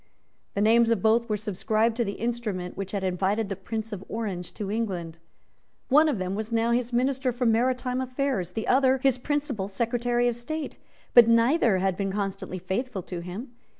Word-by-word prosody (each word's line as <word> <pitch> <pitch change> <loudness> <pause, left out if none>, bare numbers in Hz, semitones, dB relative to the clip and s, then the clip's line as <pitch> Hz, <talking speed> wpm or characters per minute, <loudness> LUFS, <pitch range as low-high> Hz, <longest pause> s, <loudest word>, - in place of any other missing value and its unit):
The 200 - 0
names 230 +2 +5
of 230 -5 +1
both 230 +2 +3
were 210 - +1
subscribed 215 +2 0
to 240 - +2
the 200 -2 -3
instrument 215 -6 -3
which 195 0 -5
had 200 -2 -2
invited 195 +3 0
the 195 - -2
Prince 220 +3 -5
of 195 -2 -6
Orange 200 -6 -4
to 200 -2 -4
England. 180 -7 -3 0.7
One 305 +4 +6
of 285 - 0
them 185 0 -2
was 215 +3 -4
now 230 0 +2
his 245 0 0
Minister 260 +1 +1
for 245 +1 -2
Maritime 250 +2 +1
Affairs; 255 -8 -2
the 220 - -3
other 265 0 +4
his 265 -2 +3
Principal 280 -7 -2
Secretary 240 +3 0
of 240 - 0
State; 305 +6 -5 0.3
but 240 -2 +9
neither 230 - +4
had 190 0 0
been 195 -1 -1
constantly 195 -2 -3
faithful 190 +3 -3
to 175 0 -6
him. 185 +9 -7
225 Hz, 185 wpm, -26 LUFS, 195-245 Hz, 0.7 s, but